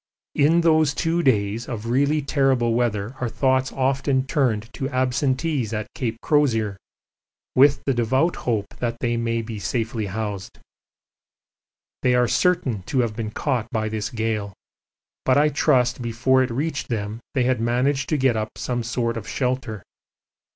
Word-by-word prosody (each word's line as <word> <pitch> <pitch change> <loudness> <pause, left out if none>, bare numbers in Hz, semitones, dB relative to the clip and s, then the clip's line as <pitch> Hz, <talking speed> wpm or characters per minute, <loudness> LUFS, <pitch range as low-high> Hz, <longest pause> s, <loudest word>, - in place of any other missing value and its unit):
In 160 +4 +4
those 155 -4 +3
two 170 0 0
days 110 -4 +1
of 115 -3 -5
really 140 +5 +1
terrible 135 -4 +2
weather 115 -1 -1
our 120 - 0
thoughts 130 +1 +1
often 135 0 0
turned 115 -5 0
to 135 - -3
absentees 130 -1 0
at 105 0 -2
Cape 115 -3 -3
Crozier 115 -9 +2 0.8
with 140 +2 +5
the 135 - +2
devout 130 +8 +1
hope 110 -4 -1
that 120 -1 -2
they 120 -1 0
may 115 0 -1
be 110 -1 -6
safely 110 +2 -2
housed. 100 -1 -5 1.4
They 125 0 +3
are 125 0 +3
certain 135 - +1
to 130 -3 +1
have 115 -3 -2
been 110 -1 -3
caught 120 -1 -2
by 110 -2 -1
this 110 0 -3
gale, 110 -3 -2 0.7
but 130 +1 +3
I 150 +1 +4
trust 130 -4 +2
before 120 +3 +2
it 130 - 0
reached 140 +3 -2
them 110 -1 -3 0.2
they 130 - +3
had 125 -2 +1
managed 125 +4 +1
to 155 - +1
get 130 -3 +2
up 110 0 -4
some 120 -1 -2
sort 115 0 -2
of 110 - -7
shelter. 125 -6 -2
125 Hz, 160 wpm, -23 LUFS, 110-135 Hz, 1.4 s, with